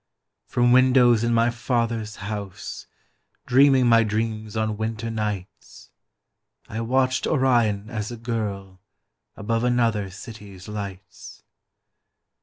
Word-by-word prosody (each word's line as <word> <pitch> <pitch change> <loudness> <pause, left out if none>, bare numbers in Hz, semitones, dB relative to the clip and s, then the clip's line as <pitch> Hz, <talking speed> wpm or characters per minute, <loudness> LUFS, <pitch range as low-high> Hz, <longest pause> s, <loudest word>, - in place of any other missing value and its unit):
From 120 0 +2
windows 125 -2 +5
in 120 - +1
my 115 +1 +3
father's 115 -2 -2
house, 100 -2 -7 0.6
Dreaming 135 0 +5
my 115 -1 +5
dreams 110 0 -3
on 110 -1 0
winter 110 +1 -3
nights, 105 -4 -6 0.8
I 110 - -4
watched 130 +2 +1
Orion 120 -7 +2
as 110 -2 -4
a 120 - -7
girl 100 -5 -4 0.5
Above 115 +2 -2
another 115 -5 +1
city's 100 -1 -11
lights. 100 -3 -8
110 Hz, 105 wpm, -24 LUFS, 105-120 Hz, 0.8 s, windows